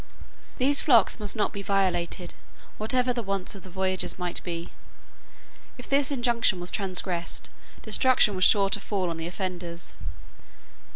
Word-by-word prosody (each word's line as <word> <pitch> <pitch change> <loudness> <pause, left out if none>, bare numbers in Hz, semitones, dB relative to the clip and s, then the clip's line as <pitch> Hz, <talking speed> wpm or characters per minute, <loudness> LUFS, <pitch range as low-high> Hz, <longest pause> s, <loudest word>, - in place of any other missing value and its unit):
These 280 +3 +4
flocks 235 -6 +4
must 205 -2 -2
not 215 - 0
be 200 - -5
violated, 185 -3 -1 0.5
whatever 250 +3 +1
the 240 - -2
wants 195 -3 -2
of 195 - -10
the 185 - -12
voyagers 185 0 0
might 180 -1 -2
be. 170 -1 -5 1.1
If 250 - -9
this 275 0 +2
injunction 240 -7 +1
were 175 - -5
transgressed 180 -2 -2 0.3
destruction 255 -5 +4
was 185 -1 0
sure 200 0 +5
to 205 - +1
fall 190 -4 -2
on 165 - -5
the 165 0 -4
offenders. 175 -2 -5
195 Hz, 150 wpm, -26 LUFS, 180-230 Hz, 1.1 s, sure